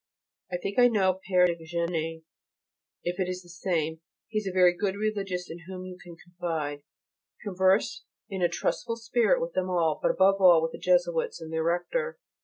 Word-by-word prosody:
I 180 - 0
think 200 +5 -3
I 245 - +8
know 190 -5 +2
Père 180 -1 +5
de 170 -2 -1
Géney, 165 -1 -2 0.8
if 175 +2 -3
it 185 -1 0
is 185 0 -4
the 175 - -17
same; 165 -3 -2 0.3
he 215 -1 0
is 210 - -6
a - - -1
very 180 -1 +5
good 195 +1 -1
Religious 200 -4 -2
in 165 0 -9
whom 185 -1 -7
you 185 0 -8
can 175 -1 -11
confide. 165 -4 -4 0.6
Converse 190 - +1 0.2
in 190 -2 -5
a 175 - +3
trustful 175 +5 -2
spirit 235 - +2
with - - -3
them 185 - -1
all, 165 -4 +1
but - - +2
above 195 +1 +3
all 175 -3 +8
with 165 0 -1
the - - -9
Jesuits - - +1
and 160 0 -8
their 160 - 0
Rector. 470 - -1
180 Hz, 195 wpm, -28 LUFS, 170-200 Hz, 0.8 s, I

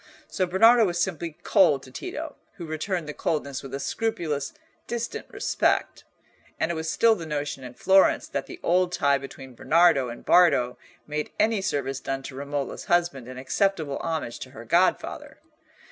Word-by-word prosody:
So 185 - -1
Bernardo 225 +6 +6
was 175 -2 -1
simply 170 -3 -2
cold 160 -10 +4
to 130 - -13
Tito, 320 - -6 0.2
who 175 - -8
returned 160 +2 -3
the 150 - -5
coldness 140 -4 -2
with 135 - -9
a - - -4
scrupulous, 170 -9 -2 0.4
distant 235 - -4
respect. - - 0 0.5
And 165 - +1
it - - -1
was 160 -1 -3
still 230 +5 +4
the 170 -7 -6
notion 145 -3 -3
in 125 -1 -9
Florence 190 +8 +4
that - - -4
the 360 - -9
old 180 +1 +2
tie 140 -5 +2
between 135 -1 -10
Bernardo 150 -2 +3
and 120 - -9
Bardo 140 -9 +4 0.3
made 150 0 -3
any 215 -1 +2
service 135 -6 -2
done 135 0 -4
to 130 - -8
Romola's 140 0 -4
husband 170 -8 +1
an 130 0 -8
acceptable 155 +1 -1
homage 160 -8 -3
to - - -8
her - - -11
godfather. - - 0
160 Hz, 170 wpm, -25 LUFS, 135-185 Hz, 0.5 s, Bernardo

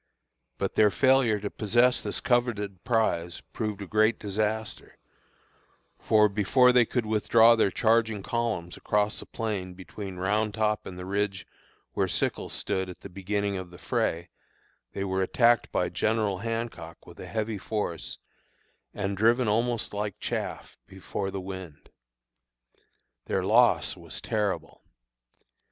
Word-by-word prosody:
But - - -2
their 105 -1 +5
failure 130 -2 +3
to 105 - -4
possess 120 +4 +2
this 105 - -3
coveted 105 -6 0
prize 90 -8 0
proved 105 -3 -3
a - - -6
great 110 +3 +2
disaster; 110 +2 -3 1.0
for 105 -1 +4
before 110 +5 +4
they 125 -1 +5
could 120 0 -1
withdraw 110 +2 +5
their 110 -3 +3
charging 110 0 +1
columns 110 -8 -2
across 105 +1 0
the - - -10
plain 100 -5 -4
between 95 +1 -8
Round 105 +3 0
Top 110 -1 0
and 90 - -8
the 90 - -6
ridge 100 0 -2 0.5
where - - +1
Sickles - - -1
stood 95 0 -2
at 90 - -10
the 100 - -9
beginning 100 +2 -2
of 95 -1 -6
the 90 - -13
fray, 85 0 -1 0.6
they 100 - -3
were 95 -1 -1
attacked 120 +4 +3
by - - +1
General 105 -4 0
Hancock 115 -7 -5
with 85 - -14
a 90 - -8
heavy 110 +1 -3
force, 100 -5 -3 0.8
and 100 -1 -2
driven 115 +4 +3
almost 115 +2 0
like 105 -1 -3
chaff - - -4
before 95 0 -5
the 95 - -4
wind. 95 -5 -9 1.4
Their - - 0
loss - - +4
was - - -7
terrible. 105 -3 -2
105 Hz, 140 wpm, -27 LUFS, 95-115 Hz, 1.4 s, their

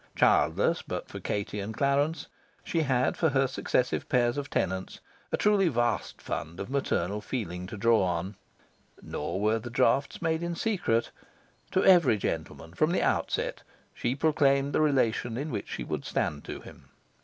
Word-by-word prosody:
Childless - - +3
but - - -5
for - - -8
Katie 105 0 -3
and 105 +2 -5
Clarence, 145 +3 +1 0.4
she 165 - -1
had 130 -4 +1
for 160 - +2
her 135 -1 +2
successive 130 -1 -1
pairs 120 -1 +2
of 145 0 -4
tenants 95 0 -2 0.3
a - - +1
truly 205 -3 +3
vast 120 -5 0
fund 80 +3 -4
of 100 +6 -5
maternal 105 -7 0
feeling 90 -7 -4
to 105 - -7
draw 115 +2 +4
on. 90 +2 -1 0.7
Nor 85 +5 -4
were 110 +2 +2
the 120 - -7
drafts 130 +3 +2
made 160 0 0
in 170 0 -2
secret. 165 - 0 0.6
To 190 - +1
every 170 - +6
gentleman, 80 -2 -4
from 155 - +2
the - - +1
outset, - - 0 0.3
she 120 +2 -1
proclaimed 140 -2 +2
the - - +3
relation 120 -5 +1
in 145 +3 -3
which - - -4
she - - -4
would - - -4
stand 70 -1 -2
to - - -6
him. - - -14
125 Hz, 165 wpm, -28 LUFS, 105-150 Hz, 0.7 s, every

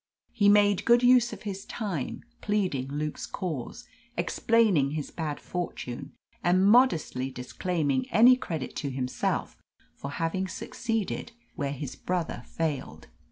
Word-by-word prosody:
He 205 -4 +4
made 205 -1 +5
good 240 +1 +5
use 245 -1 +6
of 210 -2 -9
his 195 -2 -5
time, 195 - -4 0.2
pleading 185 -11 0
Luke's 150 +2 -3
cause, 160 -11 -5 0.3
explaining 200 -12 +2
his 150 - -4
bad 155 -3 -3
fortune, 170 -8 -5 0.3
and 185 +2 +4
modestly 195 - +4
disclaiming 140 +2 -1
any 245 +3 +7
credit 165 - -5
to 140 - -2
himself 130 -1 -2 0.3
for 140 - -7
having 165 +6 -1
succeeded 225 +3 -3 0.2
where 140 -5 -2
his 140 -2 -5
brother 180 -2 -2
failed. 135 - -3
175 Hz, 125 wpm, -28 LUFS, 140-210 Hz, 0.3 s, any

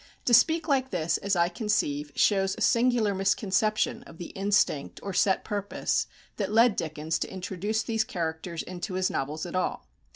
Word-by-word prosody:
To 240 - +2
speak 320 +8 +5
like 265 -3 +1
this, 165 -5 0
as 200 -1 -1
I 170 0 +3
conceive, 150 -9 -1
shows 195 -2 +2
a - - -8
singular 235 -3 +3
misconception 200 +3 +1
of 165 - -13
the 175 - -7
instinct 195 -7 0
or 195 - -4
set 190 +1 +2
purpose 205 -1 -1 0.3
that 200 -2 -2
led 225 0 +5
Dickens 160 0 -2
to - - -3
introduce 190 +3 -2
these 225 -2 0
characters 165 -2 -4
into 185 +1 -6
his 185 0 +1
novels 150 +4 -3
at 175 - -6
all. 185 - -1
195 Hz, 170 wpm, -27 LUFS, 170-215 Hz, 0.3 s, speak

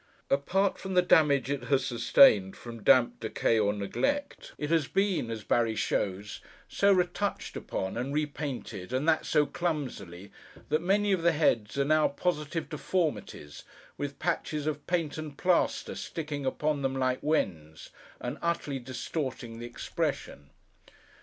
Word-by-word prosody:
Apart 190 +8 +1
from 190 -1 -5
the 180 - +5
damage 140 -6 +4
it 135 -4 -3
has 135 -1 +2
sustained 105 -5 +5
from 115 -2 -9
damp, 120 +3 +4
decay, 110 0 +1
or 105 -1 +2
neglect, 275 - -2
it 150 +1 -3
has 160 -5 +2
been 195 - 0
(as 110 -2 -5
Barry 115 0 +1
shows) 100 -1 -2 0.3
so 200 0 +3
retouched 190 +2 0
upon, 95 - -4
and 125 +3 -2
repainted, 140 -8 -4
and 135 +5 0
that 160 -1 +2
so 150 -1 +3
clumsily, 130 - -4 0.4
that 155 - +1
many 200 +3 +2
of 190 -3 +2
the 170 0 +3
heads 115 -7 +1
are, 140 - +2
now, 155 +1 +4
positive 150 +1 -2
deformities, 150 - -3 0.3
with 145 -1 -5
patches 155 -3 -2
of 150 -1 -3
paint 165 -4 -1
and 150 -2 -7
plaster 180 -2 +1
sticking 150 -4 -4
upon 150 +2 0
them 135 -1 -1
like 130 -1 0
wens, 80 - -2 0.3
and - - -5
utterly 160 -5 -1
distorting 130 -2 -5
the 120 - -6
expression. 70 -10 -4
145 Hz, 145 wpm, -29 LUFS, 120-165 Hz, 0.4 s, the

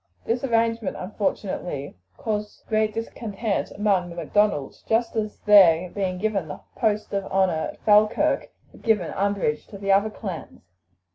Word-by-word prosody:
This 240 +3 -1
arrangement, 230 -4 0
unfortunately, 185 -6 -3 0.2
caused 210 -1 -4
great 215 -1 +1
discontent 220 -1 -3
among 200 -4 0
the 170 - -9
Macdonalds, 170 -3 0
just 225 +1 +1
as 215 -1 -2
their 180 -4 +6
being 190 -3 -2
given 200 -4 -1
the 145 - -8
post 215 -3 0
of 200 -1 0
honour 190 -4 +1
at - - -22
Falkirk 210 0 +3 0.2
had - - -17
given 210 -7 +1
umbrage 195 -6 -1
to 200 - -10
the 195 0 -1
other 200 +2 +4
clans. 190 - -7
205 Hz, 145 wpm, -24 LUFS, 185-215 Hz, 0.2 s, their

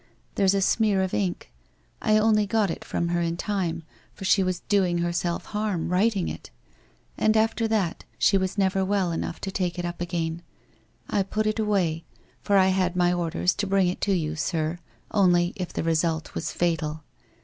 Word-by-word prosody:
There's 195 0 +3
a 195 - +1
smear 205 -2 +2
of 190 - -3
ink 190 -4 -2 0.3
— - - -38
I 215 -1 +3
only 215 -1 +3
got 210 -3 +1
it - - -6
from 170 - -2
her 175 0 0
in 170 0 -1
time, 175 -5 -2 0.3
for 195 - -7
she 195 - +4
was 185 -1 -1
doing 185 -4 +1
herself 170 0 -1
harm, 210 -6 -1
writing 195 +1 +2
it. - - -7 0.7
And 215 0 +3
after 225 +1 +1
that 205 -7 -1
she 195 - +3 0.2
never 195 -1 +2
well 190 -2 +1
enough 165 +1 -3
to 195 - -4
take 180 -3 -2
it 175 - -2
up 175 0 -5
again. 170 -1 -2 0.7
I 200 - +1
put 215 +3 -1
it 215 +1 0
away, 185 -7 0 0.4
for 200 - +2
J 190 0 +5
had 185 -1 0
my 175 0 +3
orders 175 +1 0
to 205 - -2
bring 190 -2 +3
it 180 - -5
to 200 - +2
you. 155 -4 -1
sir, 160 +1 -2 0.3
only 175 -3 +3
if 185 -4 -5
the - - -3
result 165 0 0
was 155 - -3
fatal. 160 -3 -1
185 Hz, 190 wpm, -25 LUFS, 170-200 Hz, 0.7 s, J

